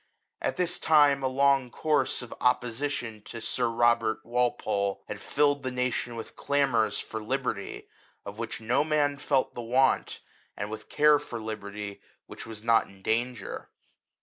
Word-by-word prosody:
At - - -1
this 180 -1 0
time 145 -3 +5
a 135 - +1
long 135 -1 +3
course 150 -1 +1
of 120 - -8
opposition 125 -2 0
to 115 - -7
Sir 120 +1 -1
Robert 115 -1 +2
Walpole 110 -4 0
had - - -6
filled 145 -1 +2
the 130 - -2
nation 125 -1 -2
with 115 - -8
clamours 135 -7 +1
for 110 - -5
liberty, 110 -4 -3 0.4
of 100 +2 -8
which 115 -1 -4
no 120 +5 +2
man 145 -2 +1
felt 135 -1 +1
the 120 - -5
want, 125 +3 +1 0.4
and 100 +1 -4
with 110 0 -8
care 150 0 +5
for 120 -5 -7
liberty, 105 -2 -6 0.2
which - - -10
was 110 -1 -8
not 115 0 +4
in 95 -1 -18
danger. 115 -1 -2
120 Hz, 155 wpm, -28 LUFS, 110-140 Hz, 0.4 s, time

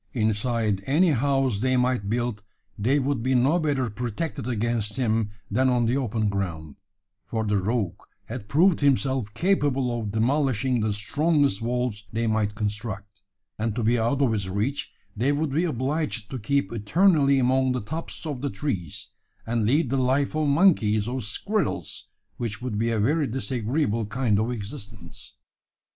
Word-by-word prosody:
Inside 110 -2 0
any 165 +7 +4
house 135 -4 +1
they 130 +2 +2
might 125 -5 +1
build, 120 -2 -1 0.3
they 125 +7 +2
would 140 -3 0
be 130 +2 +1
no 135 +8 +3
better 140 -5 0
protected 120 +5 -4
against 115 -2 -1
him 115 -4 +1 0.2
than 130 +5 +3
on 120 -2 +2
the 120 +3 +1
open 115 -5 0
ground: 85 -7 -3 0.5
for 110 -1 -2
the 105 -1 +1
rogue 105 -1 -1 0.2
had 110 -3 -7
proved 170 +4 +4
himself 135 -5 +1
capable 135 -10 +1
of 105 -3 -4
demolishing 130 +1 +1
the 110 -1 0
strongest 140 +3 +1
walls 120 -3 -2
they 115 +1 -1
might 110 -2 0
construct; 105 -1 -4 0.4
and 110 -1 -1
to 120 - -1
be 120 +2 +3
out 130 +5 +1
of 125 - +3
his 100 -4 -2
reach, 105 +9 -2 0.2
they 125 +6 +1
would 145 0 -1
be 160 +6 +1
obliged 140 -5 -2
to 130 - -4
keep 140 -1 0
eternally 140 - +3
among 130 0 +2
the 125 - 0
tops 160 +10 -6
of 145 -5 -4
the 140 - -1
trees, 95 - -4 0.4
and 115 -2 0
lead 140 +1 +2
the 135 - +1
life 130 +2 +1
of 155 -1 +1
monkeys 140 - +3
or 130 +1 -2
squirrels 200 - -2 0.3
which 115 -3 -3
would 120 -4 -3
be 115 +1 +1
a 115 -2 0
very 145 +7 +2
disagreeable 120 -2 -1
kind 110 -3 +1
of 110 +2 0
existence. 105 - -8
120 Hz, 165 wpm, -25 LUFS, 105-140 Hz, 0.5 s, any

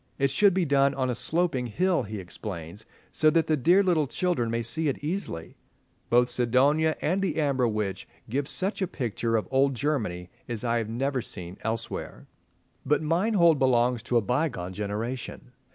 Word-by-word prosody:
It 140 -2 +1
should 200 +3 +4
be 185 -2 +2
done 140 -1 +3
on 130 -2 0
a - - -1
sloping 155 -1 0
hill, 180 - +1
he 110 -2 -6
explains, 95 +1 -8 0.2
so 155 - +4
that 165 0 +2
the 155 - +2
"dear 175 +8 +4
little 165 -6 +2
children" 170 -8 0
may 115 0 -1
see 160 +7 0
it 140 - 0
easily. 150 - -4 0.5
Both 120 +1 +4
"Sidonia" 140 +7 +2
and 185 +5 +1
"The 185 -6 -1
Amber 135 -5 +2
Witch" 105 -3 -3 0.2
give 135 +4 -2
such 195 +5 -1
a 190 - +1
picture 115 -5 -2
of 110 - -3
old 135 0 +3
Germany 110 -11 -2 0.2
as 120 -1 -3
I 120 -1 +1
have 110 -2 -4
never 130 +3 -1
seen 90 -5 -7
elsewhere. 115 0 -4 0.6
But 150 +3 +1
Meinhold 170 -1 +3
belongs 125 -2 +2
to 120 +1 0
a - - +3
bygone 115 - -1
generation. 110 +6 -5
130 Hz, 175 wpm, -27 LUFS, 115-155 Hz, 0.6 s, should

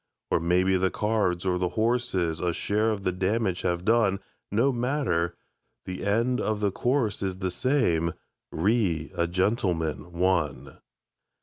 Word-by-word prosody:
Or - - +3
maybe 90 +3 +2
the 95 +1 +2
cards 105 -5 0
or 90 -1 +1
the 90 -1 0
horses 110 -8 0
A 90 0 0
share 105 +5 0
of 105 -3 -2
the 90 - +1
damage 95 +1 0
have 90 0 -1
done 110 -4 +3 0.3
No 115 +7 +3
matter; 120 - 0 0.5
the 95 0 -5
end 115 +5 +1
of 110 -1 -1
the 100 -1 +1
course 120 0 0
is 95 -2 -2
The 95 -1 -2
same: 90 - +1 0.4
"Re 90 -4 +1
a 85 - 0
Gentleman, 90 -3 -1
One". 75 -7 -1
95 Hz, 145 wpm, -27 LUFS, 85-110 Hz, 0.5 s, Or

